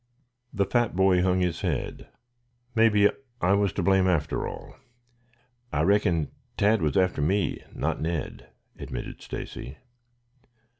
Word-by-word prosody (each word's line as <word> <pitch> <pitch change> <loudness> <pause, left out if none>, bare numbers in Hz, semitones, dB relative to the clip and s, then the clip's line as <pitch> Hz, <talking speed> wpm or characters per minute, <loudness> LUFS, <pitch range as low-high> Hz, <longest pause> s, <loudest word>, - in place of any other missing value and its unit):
The 100 -3 +1
fat 120 -1 +1
boy 95 -1 +4
hung 90 0 +2
his 90 -2 -1
head. - - -3 0.7
"Maybe 105 -3 +5 0.3
I 90 0 +3
was 100 -1 +2
to 100 - -2
blame, 95 0 +4
after 85 -3 0
all. - - -9 1.0
I - - +1
reckon 90 -6 +2 0.3
Tad 105 +1 +3
was 80 +4 +1
after 90 -5 +2
me, 95 +4 0
not - - -2
Ned," 80 0 -4 0.3
admitted - - -6
Stacy. 65 - -7
95 Hz, 130 wpm, -26 LUFS, 85-100 Hz, 1.0 s, Maybe